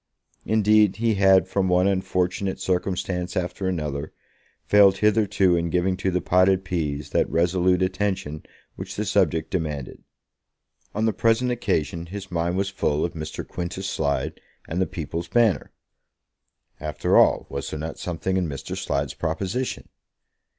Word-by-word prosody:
Indeed, 105 -2 +4
he 115 +1 +1
had, 95 -1 +5
from 95 0 0
one 90 +1 +3
unfortunate 95 0 0
circumstance 90 -1 -2
after 90 +1 -2
another, 75 -5 -3 0.5
failed 100 -2 +6
hitherto 100 -3 +3
in 85 0 0
giving 90 +2 +1
to 95 - -1
the 90 -1 0
potted 95 +2 +3
peas 75 -5 -3
that - - +1
resolute 90 +2 +2
attention 95 -5 -2 0.3
which - - -7
the - - -2
subject 80 -1 +1
demanded. 75 -7 -4 0.9
On 110 +2 +1
the 110 - +2
present 115 +2 +2
occasion 85 -7 -1
his 100 +1 -8
mind 85 +1 -1
was 95 0 0
full 75 -5 0
of 85 - -4
Mr. 80 -2 -6
Quintus 90 +2 -4
Slide 70 -5 -2 0.3
and 85 +3 -2
the 95 - +1
People's 85 -1 -5
Banner. 115 -5 +2 1.1
After 75 -1 -1
all, - - +5
was 70 - -5
there - - -5
not 80 +1 -5
something 90 +2 -2
in 90 -2 0
Mr. 70 -2 -5
Slide's 70 0 -2
proposition? 95 +10 -3
90 Hz, 145 wpm, -24 LUFS, 85-95 Hz, 1.1 s, failed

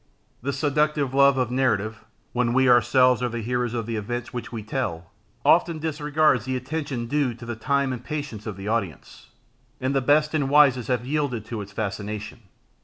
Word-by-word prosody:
The 140 +4 -2
seductive 145 -1 0
love 140 0 +5
of 125 -2 0
narrative, 110 -4 0 0.3
when 125 -1 +1
we 130 +1 +4
ourselves 125 0 +4
are 125 - 0
the 115 -1 -4
heroes 125 0 -1
of 115 -2 -2
the 115 0 -3
events 120 +3 -4
which 120 -1 -5
we 115 -3 -5
tell, 105 -8 -4 0.3
often 170 -1 +4
disregards 150 -5 +1
the 130 0 -2
attention 130 -1 -3
due 135 -1 0
to 120 0 -11
the 120 0 -4
time 140 +3 0
and 125 - -7
patience 140 -9 -5
of 105 -3 -5
the 100 +1 -7
audience, 105 -7 -4 0.5
and 130 +2 -1
the 135 - +2
best 150 +4 +3
and 145 -4 0
wisest 140 -4 +5
have 125 -2 -1
yielded 135 -6 -1
to 115 -1 -5
its 100 0 -9
fascination. 105 +1 -5
125 Hz, 185 wpm, -24 LUFS, 115-140 Hz, 0.5 s, love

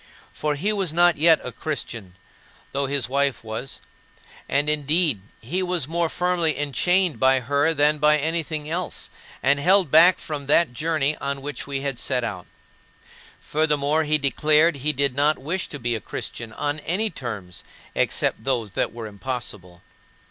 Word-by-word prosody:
For 150 -1 -1
he 200 +9 0
was 195 -6 -1
not 175 +1 +4
yet 160 0 +6
a 125 - -5
Christian, 115 - -5 0.6
though 140 0 -1
his 140 -3 0
wife 140 -1 0
was; 110 +4 -5 0.7
and, 145 +2 +1
indeed, 150 - +2 0.2
he 170 +12 -2
was 180 -6 -1
more 170 +1 0
firmly 175 -3 0
enchained 170 +5 +1
by 130 0 +4
her 140 +5 +1
than 150 +1 +3
by 150 +1 +5
anything 155 0 -2
else, 170 +2 -4 0.3
and 140 +1 +3
held 180 0 +4
back 170 +4 +7
from 145 -3 -6
that 150 -2 +3
journey 155 +1 0
on 140 -1 -4
which 145 -2 -5
we 140 -1 -3
had 135 -3 -3
set 125 -1 0
out. 95 -6 -5 0.9
Furthermore, 150 0 +1
he 155 0 +2
declared 150 +2 +3
he 145 +3 0
did 140 -2 0
not 145 +3 +2
wish 165 +8 -3
to 145 - -7
be 120 -3 -2
a 110 - -3
Christian 115 +4 -6
on 145 +7 -3
any 195 +8 -1
terms 105 -8 -6 0.3
except - - 0
those 120 -6 -1
that - - -1
were 115 -1 -7
impossible. 100 -5 -6
145 Hz, 165 wpm, -23 LUFS, 130-160 Hz, 0.9 s, back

